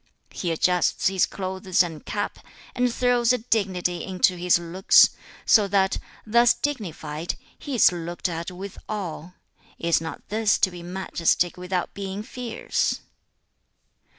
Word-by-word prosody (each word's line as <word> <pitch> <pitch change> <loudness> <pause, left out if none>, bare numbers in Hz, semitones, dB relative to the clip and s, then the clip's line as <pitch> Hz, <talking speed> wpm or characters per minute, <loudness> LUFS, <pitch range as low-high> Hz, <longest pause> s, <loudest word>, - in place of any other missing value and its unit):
He 175 - -3
adjusts 180 +3 +2
his 190 -1 +2
clothes 185 -1 0
and 165 -4 -7
cap, 205 -1 -3 0.3
and 250 0 +1
throws 245 0 +2
a 250 - +3
dignity 190 -6 -1
into 185 -1 +2
his 175 0 +3
looks, 175 +2 +5 0.3
so 210 -3 +5
that, 190 -1 +1 0.3
thus 235 +2 +4
dignified, 170 - -4 0.2
he 285 -3 -5
is 225 - +6
looked 175 +1 -3
at 170 0 -4
with 185 +2 -8
awe; 180 -5 -5 0.4
is 170 -1 +1
not 160 - -7
this 215 -1 +2
to 185 - +2
be 175 -1 -9
majestic 175 -1 0
without 180 0 -3
being 195 +1 -5
fierce?' 235 0 -2
185 Hz, 135 wpm, -24 LUFS, 175-215 Hz, 0.4 s, is